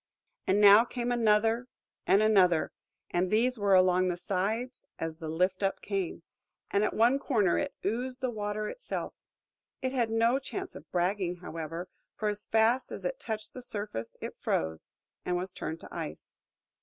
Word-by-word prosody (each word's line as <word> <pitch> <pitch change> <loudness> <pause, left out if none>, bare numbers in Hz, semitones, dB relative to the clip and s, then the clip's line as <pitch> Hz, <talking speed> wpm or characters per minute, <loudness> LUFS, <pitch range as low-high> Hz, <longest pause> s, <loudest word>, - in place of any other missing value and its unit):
And 195 +2 +3
now 205 +2 +9
came 245 0 -3
another, 225 +1 +3 0.4
and 200 +2 +5
another, 185 -6 +4 0.4
and 180 +1 +1
these 235 +3 +2
were 200 -1 +4
along 185 0 +4
the 175 -1 -1
sides, 210 +8 -2
as 165 -1 -4
the 160 - -6
lift 185 +4 +1
up 195 -1 0
came; 195 -4 -3 0.5
and 200 - +3
at - - 0
one 240 +5 +4
corner 210 -10 +2
in - - 0 0.2
oozed 250 +5 -2
the 255 -2 -1
water 210 -1 -3
itself. - - -5 0.7
It 260 - -2
had 240 -4 +1
no 230 +3 +3
chance 375 +7 -6
of - - -12
bragging, 180 0 0
however: 165 0 -6 0.3
for 215 - -1
as 210 0 -5
fast 225 +3 +2
as - - -6
it - - -2
touched 220 -2 -5
the 255 - -8
surface 205 - -5
it - - -5
froze, 80 0 -2 0.3
and 180 0 0
was 185 +1 -4
turned 160 -2 -5
to - - -11
ice. - - -6
210 Hz, 170 wpm, -30 LUFS, 180-235 Hz, 0.7 s, now